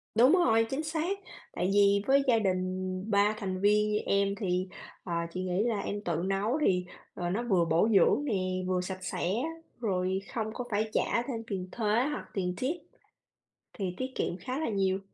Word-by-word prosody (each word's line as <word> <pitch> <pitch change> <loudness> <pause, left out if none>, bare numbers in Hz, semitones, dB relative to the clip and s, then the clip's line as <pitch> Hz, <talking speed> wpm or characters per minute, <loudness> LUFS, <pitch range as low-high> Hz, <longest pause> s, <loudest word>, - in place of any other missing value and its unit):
Đúng 245 +5 +6
rồi, 225 -11 +4
chính 270 +5 -2
xác. 325 +5 -2 0.3
Tại 180 - 0
vì 200 0 +5
với 275 +1 +5
gia 235 -3 +5
đình 185 -3 +1 0.5
3 205 +1 +4
thành 190 -2 -3
viên 210 +1 +3
như 210 - +2
em 200 0 +2
thì, 185 -3 -1 0.4
à, 170 -1 -2
chị 185 - -3
nghĩ 185 +2 0 0.2
em 205 0 -3
tự 170 - 0
nấu 200 +8 0
thì, 180 -1 +2 0.3
ờ, 175 -1 -3
nó 205 +7 -1
vừa 190 -8 +2
bổ 165 +7 +3
dưỡng 275 +8 +4
nè, 185 -6 -1
vừa 185 -1 +1
sạch 185 +1 -6
sẽ, 180 0 -1 0.5
rồi 190 -4 0
không 220 -2 -1
có 250 - -4
phải 215 +1 0
trả 235 - +1
thêm 230 -4 -3
tiền 185 -3 -3
thuế 220 -3 -2 0.2
hoặc 295 - -4
tiền 180 -2 -1
tip 275 +7 0 1.0
thì 190 -3 -3
tiết 255 - -2
kiệm 175 - -1
khá 255 - -4
là 315 - -1
nhiều. 195 -2 +1
200 Hz, 190 wpm, -30 LUFS, 185-230 Hz, 1.0 s, Đúng